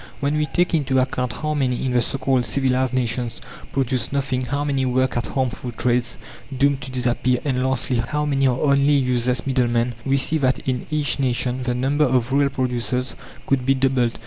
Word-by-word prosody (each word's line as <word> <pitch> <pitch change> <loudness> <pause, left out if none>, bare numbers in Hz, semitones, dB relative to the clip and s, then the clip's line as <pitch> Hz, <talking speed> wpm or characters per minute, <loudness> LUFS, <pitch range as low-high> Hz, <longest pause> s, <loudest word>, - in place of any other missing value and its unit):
When 140 +1 0
we 150 0 0
take 175 +2 0
into 140 -4 +1
account 125 -1 0
how 155 +5 -3
many, 130 -4 0
in 130 - 0
the 120 - +3
so 125 - -1
called 130 -2 +1
civilized 130 +1 +1
nations, 120 -1 -1 0.3
produce 130 -3 -1
nothing, 135 -2 -1
how 140 +4 -2
many 140 -2 0
work 130 0 +1
at 120 - -1
harmful 130 -2 -2
trades, 120 +1 0 0.3
doomed 140 +1 +1
to 130 - -6
disappear, 125 0 0
and 130 -3 0
lastly, 130 -1 0
how 150 +6 -1
many 135 -2 +2
are 125 -1 0
only 140 0 +3
useless 125 -3 +1
middlemen, 120 -2 +1
we 135 +1 +1
see 155 +4 +1
that 130 -2 +2
in 125 -1 -2
each 150 -2 -1
nation 125 -1 0
the 125 -1 -1
number 140 +4 +2
of 125 -1 +1
real 140 0 +3
producers 125 -1 -2 0.3
could 135 -2 +1
be 135 +1 +3
doubled. 130 -3 +1
130 Hz, 195 wpm, -22 LUFS, 125-140 Hz, 0.3 s, the